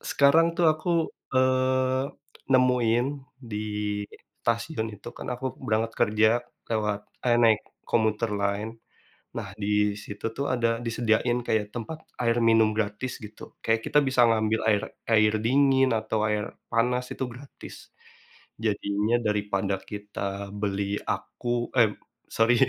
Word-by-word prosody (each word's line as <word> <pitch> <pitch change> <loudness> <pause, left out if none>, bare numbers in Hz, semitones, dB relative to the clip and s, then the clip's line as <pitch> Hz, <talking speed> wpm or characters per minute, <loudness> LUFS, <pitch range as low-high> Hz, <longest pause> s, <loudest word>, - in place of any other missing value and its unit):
sekarang 150 +4 +4
tuh 175 -1 +3
aku, 155 +3 -4 0.4
eee, 130 0 +2 0.5
nemuin 125 -2 +3 0.4
di 105 - -3 0.9
stasiun 115 +1 -1
itu 105 - -10
kan - - -7
aku 130 +2 -4 0.2
berangkat 110 +1 +1
kerja, 110 +1 +4 0.4
lewat 105 -2 0 0.3
eh 120 -1 +4
naik 110 -2 +5 0.3
commuter 110 0 +1
line. 100 +2 -1 0.7
Nah, - - -4
di 105 0 +1
situ 105 +2 -6
tuh 140 - -1
ada 115 -2 +1
disediain 115 +1 +1
kayak 105 -2 +1
tempat 120 +7 -5 0.2
air 115 0 +2
minum 115 -1 +5
gratis, 110 +4 -2
gitu. 105 +1 -11 0.2
Kayak 115 0 +2
kita - - +5
bisa 130 -1 +2
ngambil 110 0 +1
air 105 -1 +2 0.3
air 110 -1 +5
dingin, 135 +1 +4
atau 110 0 -2
air 105 0 0 0.3
panas, 125 +2 +1
itu - - -3
gratis. 135 +4 -12 0.7
Jadinya, 105 +1 0
daripada 100 -2 0 0.2
kita 100 -1 -5
beli 100 0 -2
aku 120 0 -3
eh 115 -3 +6 0.4
sorry. 115 +2 +4
115 Hz, 125 wpm, -26 LUFS, 105-125 Hz, 0.9 s, eh